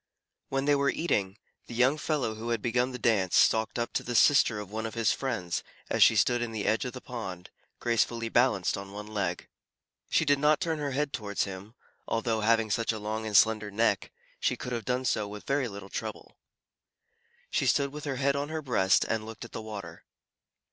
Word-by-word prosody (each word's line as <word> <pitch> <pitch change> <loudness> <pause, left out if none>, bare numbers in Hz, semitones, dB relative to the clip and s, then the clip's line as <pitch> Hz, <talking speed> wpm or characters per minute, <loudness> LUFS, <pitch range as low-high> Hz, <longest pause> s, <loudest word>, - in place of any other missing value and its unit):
When 135 0 -1
they 145 - +4
were 140 -1 +2
eating, 100 - -1 0.3
the 120 - -8
young 130 +5 +3
fellow 140 -8 -1
who 110 +2 -6
had 115 -1 +1
begun 125 +4 0
the 125 - -5
dance, 105 -6 +2
stalked 110 0 +3
up 120 0 -2
to - - 0
the 120 - -4
sister 120 -3 +5
of 105 -1 -8
one 110 +1 -3
of 110 - -8
his 115 -2 +2
friends, 115 -10 -2 0.3
as - - +1
she - - +7
stood 120 -1 +3
in 120 -1 -2
the 110 -2 -3
edge 110 +3 +1
of 125 - -4
the 125 - -8
pond, 95 -8 -7 0.3
gracefully 115 0 0
balanced 115 -6 +2
on 100 0 -9
one 105 +1 -6
leg. 100 -5 -3 0.6
She 160 - +2
did 145 -1 +3
not 150 +1 +4
turn 165 -4 -1
her 145 -1 -2
head 145 +1 -1
towards 105 -5 -2
him, 100 +3 -8 0.3
although, 115 -1 0
having 110 0 +2
such 115 +2 +1
a 110 - -4
long 110 +1 -3
and 105 -2 +4
slender 110 -1 +4
neck, 105 -1 +1 0.3
she - - 0
could 125 - -6
have 115 -3 -3
done 125 +1 -1
so 110 -3 0
with 105 0 -9
very 140 -2 +1
little 100 -2 -9
trouble. - - -6 1.2
She - - +1
stood 140 -1 +2
with 150 0 -7
her 140 -2 -2
head 140 +1 +1
on 140 +1 -2
her 155 0 -4
breast 95 -8 +3
and 110 -1 -1
looked 110 +1 -8
at - - -12
the - - -5
water. 110 -2 -8
115 Hz, 215 wpm, -29 LUFS, 105-130 Hz, 1.2 s, she